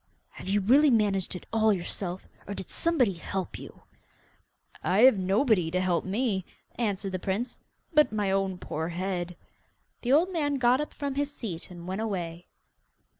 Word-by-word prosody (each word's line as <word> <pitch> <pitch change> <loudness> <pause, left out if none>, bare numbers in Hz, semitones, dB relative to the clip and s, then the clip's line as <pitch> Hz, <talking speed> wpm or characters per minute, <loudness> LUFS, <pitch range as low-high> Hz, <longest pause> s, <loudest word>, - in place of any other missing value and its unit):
'Have - - -10
you 205 +1 +2
really 275 +9 +5
managed 205 -6 +2
it 180 - -8
all 220 -1 +4
yourself, 180 -1 -3 0.2
or 200 - -4
did 190 - -7
somebody 280 - +2
help 185 +2 -4
you?' - - -12 1.0
'I 185 - +2
have 255 -3 +8
nobody 195 - +2
to 180 +2 0
help 185 -2 +1
me,' 200 -1 0 0.3
answered 200 -4 -2
the 185 - -2
prince, 200 +7 -3 0.3
'but 300 -1 +5
my 205 -3 0
own 195 -1 0
poor 160 -2 -4
head.' 180 0 -3 0.7
The 245 - -1
old 340 +7 +4
man 290 -4 +1
got 255 +1 +3
up 300 - -4
from 285 -1 -3
his 285 +1 -1
seat 195 - -6
and 175 -1 -10
went 190 +3 -2
away. 175 -5 -4
200 Hz, 170 wpm, -28 LUFS, 185-250 Hz, 1.0 s, have